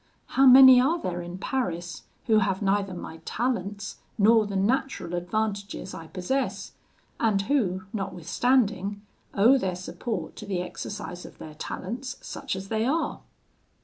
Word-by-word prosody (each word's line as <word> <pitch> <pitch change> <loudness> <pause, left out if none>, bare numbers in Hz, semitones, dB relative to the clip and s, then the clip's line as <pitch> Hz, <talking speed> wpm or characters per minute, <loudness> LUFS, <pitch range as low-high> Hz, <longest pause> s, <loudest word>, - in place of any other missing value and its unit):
How 270 +1 +4
many 260 -1 +10
are 320 +7 +2
there 175 - -3
in 175 +1 -7
Paris, 175 -7 -3 0.2
who 220 -2 +4
have 195 0 0
neither 195 -1 +1
my 165 -2 -7
talents, 200 +1 -3 0.2
nor 220 +1 +5
the 200 - -5
natural 220 -2 0
advantages 200 +2 -3
I 165 - -8
possess, 195 +11 -2 0.5
and 210 -4 +2
who, 195 -7 0
notwithstanding, 200 +2 0 0.3
owe 240 +7 +6
their 185 -5 -1
support 185 0 -5
to 210 - -8
the 190 -3 -1
exercise 180 -1 -6
of - - -12
their 155 - -9
talents, 240 - -5
such - - -5
as 190 +1 -7
they 220 0 0
are? 295 +7 0
200 Hz, 145 wpm, -26 LUFS, 185-240 Hz, 0.5 s, many